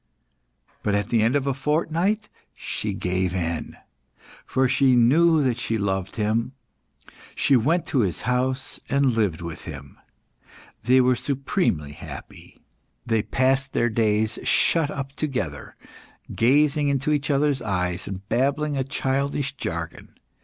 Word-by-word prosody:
But 100 - 0
at 100 0 -1
the 115 -2 +2
end 115 +5 +2
of 140 -1 +1
a 140 - +1
fortnight 165 - 0 0.3
she - - -3
gave 90 0 -1
in, 85 -2 -3 0.7
for 130 0 +2
she 130 0 +3
knew 155 +6 +5
that 125 -3 0
she 115 -2 -1
loved 95 -2 -2
him; 115 +4 0 0.8
she 140 - +3
went 155 +9 +2
to 135 - +1
his 95 -7 0
house 130 +1 -1
and 140 -1 +3
lived 100 -8 0
with 85 -2 -7
him. 70 -4 -9 0.9
They 130 +2 +5
were 125 0 +3
supremely 125 - -1
happy. - - -11 0.5
They 115 -2 +1
passed 135 +4 0
their 120 - +2
days 110 0 +1
shut 165 -4 +2
up 140 -2 -5
together, 130 - -4 0.6
gazing 145 +4 +3
into 140 +1 0
each 145 0 0
other's 140 -1 +2
eyes, 90 -4 -2
and 95 0 -7
babbling 140 +5 0
a 135 - +1
childish 140 +1 -1
jargon. - - -6
130 Hz, 140 wpm, -24 LUFS, 105-140 Hz, 0.9 s, knew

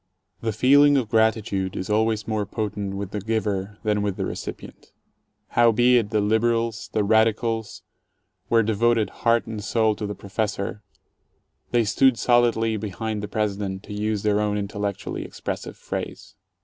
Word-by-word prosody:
The 115 - -1
feeling 140 +6 +5
of 120 -5 -1
gratitude 110 -4 +1
is 95 - -4
always 110 0 +1
more 110 -3 -1
potent 105 -2 -3
with 100 -1 -5
the 105 - -3
giver 105 -2 -2
than 105 -1 +1
with 100 -2 -2
the - - -1
recipient. - - -8 0.6
Howbeit 120 -1 +4
the 105 0 +1
"liberals", 115 +1 0
the 105 - +1
"radicals", 110 +1 +1 0.7
were 115 -1 +4
devoted 110 +1 +1
heart 115 -1 +3
and 110 -2 -6
soul 110 0 +2
to 105 - -3
the 105 - -5
professor, 105 0 -3 0.5
— - - -47
they 120 -1 +3
stood 130 +4 +3
solidly 115 -2 +2
behind 105 +1 -4
the 105 - -4
President, 100 -2 -2
to - - -8
use 105 0 -2
their 105 -1 +2
own 105 -1 0
intellectually 100 -1 -4
expressive - - -6
phrase. 95 - -6
110 Hz, 150 wpm, -24 LUFS, 105-115 Hz, 0.7 s, feeling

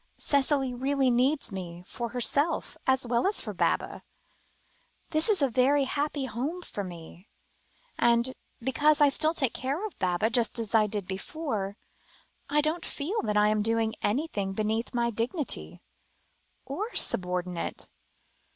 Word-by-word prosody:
Cicely 275 -2 +2
really 265 +1 +1
needs 260 +3 +2
me, 175 -2 -7
for 235 +4 -5
herself, 280 +7 0
as 260 -1 +3
well 240 +7 +1
as 405 - +3
for - - -4
Baba; - - 0 1.1
this 310 +6 +3
is 395 -9 +3
a - - +5
very 275 +4 +3
happy 285 +1 -1
home 275 +10 -3
for 205 - -5
me, 175 +1 -10 0.7
and, 235 +2 +3 0.3
because 290 +5 +3
I 290 -1 +6
still 310 +4 +3
take 265 -7 0
care 275 - -2
of 430 - -8
Baba 185 +5 +1
just 235 -2 +1
as 225 -2 -3
I 215 -2 +5
did 205 -2 -3
before, 200 -1 -4 0.7
I 300 +1 +3
don't 310 +3 -1
feel 340 +10 -3
I 210 0 +3
am 215 0 +1
doing 225 0 +1
anything 205 -5 -1
beneath 220 +3 -1
my 235 0 +1
dignity, 245 - -3 0.8
or 410 - -4
subordinate." 180 -1 -1
245 Hz, 140 wpm, -28 LUFS, 210-290 Hz, 1.1 s, I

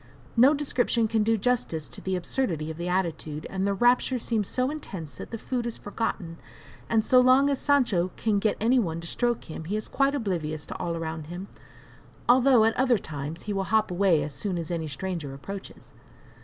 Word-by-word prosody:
No 260 +6 +6
description 245 -5 +1
can 220 0 +1
do 225 +1 +2
justice 195 - -1
to 125 - -9
the 190 0 -1
absurdity 170 - -2
of 160 - -8
the 170 +1 -4
attitude, 165 -4 -2
and 190 +1 -1
the 200 - +1
rapture 245 +3 +3
seems 220 -4 -1
so 255 +2 0
intense 170 - -7
that 230 - -7
food 245 0 -2
is 235 - -2
forgotten, 200 -5 -4 0.5
and 220 -1 +2
so 255 - +6
long 260 +3 +5
as 275 - 0
Sancho 235 -11 +2
can 215 -3 +1
get 215 +1 +1
any 245 +4 +3
one 165 -7 -1
to - - -9
stroke 240 +6 0
him, 160 -1 -8
he 195 +6 -2
is 215 - -3
quite 275 +1 +1
oblivious 165 - -2
to - - -7
all 170 -1 -2
around 160 -1 -5
him, 175 +4 -7 0.8
although 250 -2 +6
at 225 - +2
other 255 -2 +4
times 155 -2 -6
he 205 - -3
will 195 -1 -1
hop 220 -2 +2
away 175 -4 +3
as 145 0 -5
soon 180 +6 -3
as 170 0 -4
any 165 -2 -2
stranger 150 -1 -4
approaches. 195 +8 -9
200 Hz, 200 wpm, -27 LUFS, 165-240 Hz, 0.8 s, No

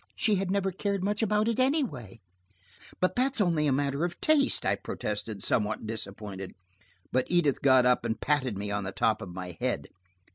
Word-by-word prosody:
She 215 - +2
had 190 0 -2
never 195 0 0
cared 200 +1 -2
much 205 +2 0
about 215 0 +2
it 230 +1 0
anyway." 230 - -1 0.8
"But 185 - +1
that's 260 +1 +1
only 165 -6 +2
a - - +2
matter 140 +2 0
of 175 0 -3
taste," 300 -3 +3
I - - +2
protested, 105 -1 -4
somewhat 110 0 +1
disappointed. 100 -3 -6 0.6
But 130 0 +1
Edith 170 -6 +2
got 130 -2 +5
up 125 0 +3
and 110 - -2
patted 130 -7 0
me 100 +1 -4
on 100 0 -1
the 95 - -4
top 110 - +1
of 95 - -6
my 90 -1 -7
head. - - -2
140 Hz, 185 wpm, -28 LUFS, -, 0.8 s, got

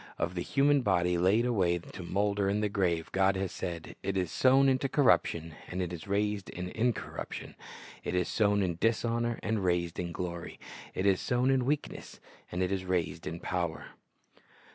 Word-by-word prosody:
Of 85 +1 -1
the 90 - -3
human 140 +6 +3
body 90 -5 +2
laid 95 +7 +3
away 95 -8 +2
to 85 - -10
molder 100 +2 0
in 105 +2 +1
the 105 - +1
grave 85 -5 0
God 95 +1 +3
has 95 -1 -2
said, 85 -2 -5
"It 100 0 -2
is 90 -3 -1
sown 135 +1 +5
in 130 -1 +3
corruption; 90 - +2 0.2
it 90 -1 -2
is 85 +3 -7
raised 100 0 0
in 90 0 -5
incorruption: 115 +3 -3 0.5
it - - -2
is 90 -1 +1
sown 105 -2 +2
in 85 -3 -1
dishonor; 115 +1 +1
it - - -4
is - - +2
raised 90 -2 0
in 85 -1 -3
glory: 85 0 -5 0.4
it 95 - -1
is 95 -2 +3
sown 125 +2 +2
in 130 -2 +2
weakness; 145 +2 -3 0.3
it 90 +1 -1
is 95 -1 -1
raised 90 -2 -2
in 85 - -4
power."' 85 -3 -3
95 Hz, 180 wpm, -30 LUFS, 90-110 Hz, 0.5 s, sown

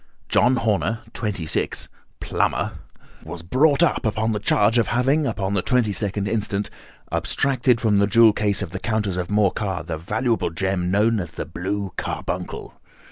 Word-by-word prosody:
John 125 +2 +4
Horner, 110 -1 0
26, 100 -7 -2 0.3
plumber, - - -1 0.5
was 80 +1 -8
brought 140 - +3
up 170 - +1
upon 110 0 0
the 105 - -1
charge 105 +2 +3
of 115 - +1
having 135 +5 +1
upon 95 -4 -2
the 100 - +1
22nd 105 -3 0
inst., 105 -1 -2 0.4
abstracted 125 - +1
from 105 -4 +2
the 100 - +3
jewel 115 +1 +6
case 105 -1 +1
of 90 - -7
the 95 - -5
Countess 105 -4 -1
of 90 -1 -3
Morcar 100 -3 0
the 80 -2 -4
valuable 110 +7 -1
gem 90 +1 -1
known 105 +3 +2
as 85 -4 -4
the - - -4
blue 95 +4 -4
carbuncle. - - -4
105 Hz, 155 wpm, -22 LUFS, 95-115 Hz, 0.5 s, jewel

